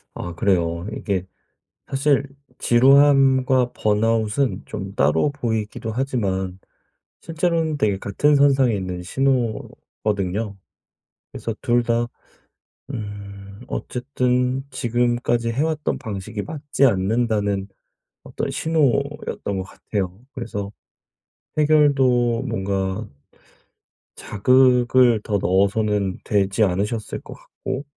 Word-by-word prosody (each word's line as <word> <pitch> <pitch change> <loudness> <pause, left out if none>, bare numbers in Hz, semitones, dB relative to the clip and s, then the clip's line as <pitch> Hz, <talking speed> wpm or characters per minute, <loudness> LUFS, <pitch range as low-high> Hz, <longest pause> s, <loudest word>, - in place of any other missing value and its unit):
아 90 -1 -5
그래요. 85 -2 0
이게 95 -3 -2 0.6
사실 140 0 +1 0.3
지루함과 130 0 +4
번아웃은 110 +1 +1
좀 100 -1 -6
따로 80 - +2
보이기도 110 -4 -3
하지만 95 -8 -2 0.6
실제로는 165 -2 0
되게 105 -7 +1
같은 145 +10 +2
선상에 135 -5 +4
있는 90 -2 -4
신호거든요. 105 -4 -2 0.7
그래서 - - -4
2 120 0 +2
다 120 0 0 0.9
음 100 -2 -8
어쨌든 125 - -1
지금까지 120 -1 0
해왔던 155 +4 -1
방식이 105 -1 -5
맞지 145 -3 0
않는다는 100 -2 +1 0.6
어떤 - - -4
신호였던 140 -8 -1
것 - - -1
같아요. 95 -1 -4
그래서 105 -5 -5 0.9
해결도 135 -6 +3
뭔가 100 -2 -2 1.0
자극을 125 0 +3
더 105 -3 0
넣어서는 100 +1 +1
되지 100 0 0
않으셨을 105 +4 -1
것 - - -10
같고 130 +2 -6
115 Hz, 220 characters per minute, -22 LUFS, 100-130 Hz, 1.0 s, 지루함과